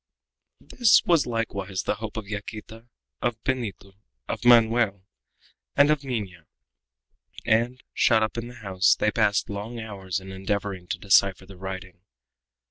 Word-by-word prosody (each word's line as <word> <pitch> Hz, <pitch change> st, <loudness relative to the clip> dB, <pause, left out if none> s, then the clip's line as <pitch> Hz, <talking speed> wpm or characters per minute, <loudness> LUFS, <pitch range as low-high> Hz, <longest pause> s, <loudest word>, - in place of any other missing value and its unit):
This 240 Hz, -4 st, +3 dB
was 165 Hz, -7 st, +3 dB
likewise 100 Hz, -5 st, -3 dB
the -, -, 0 dB
hope 110 Hz, 0 st, -7 dB
of 110 Hz, -2 st, -5 dB
Yaquita, 110 Hz, +2 st, -8 dB, 0.3 s
of 120 Hz, -2 st, -1 dB
Benito, 110 Hz, -7 st, -3 dB, 0.3 s
of -, -, -4 dB
Manoel, 115 Hz, -5 st, +4 dB, 0.7 s
and 145 Hz, +1 st, +5 dB
of 150 Hz, -2 st, 0 dB
Minha, 100 Hz, -, -5 dB, 1.0 s
and, 120 Hz, +3 st, +1 dB
shut 110 Hz, -2 st, +4 dB
up 110 Hz, -, -2 dB
in 115 Hz, 0 st, -4 dB
the 120 Hz, -, -11 dB
house, 95 Hz, -5 st, +2 dB
they 105 Hz, -, +1 dB
passed 105 Hz, -2 st, +1 dB
long 105 Hz, +3 st, -6 dB
hours 100 Hz, -4 st, -4 dB
in 95 Hz, 0 st, -10 dB
endeavoring 95 Hz, -1 st, -3 dB
to -, -, -3 dB
decipher 100 Hz, -1 st, +3 dB
the 95 Hz, 0 st, -13 dB
writing. 95 Hz, -1 st, -8 dB
105 Hz, 140 wpm, -25 LUFS, 95-120 Hz, 1.0 s, and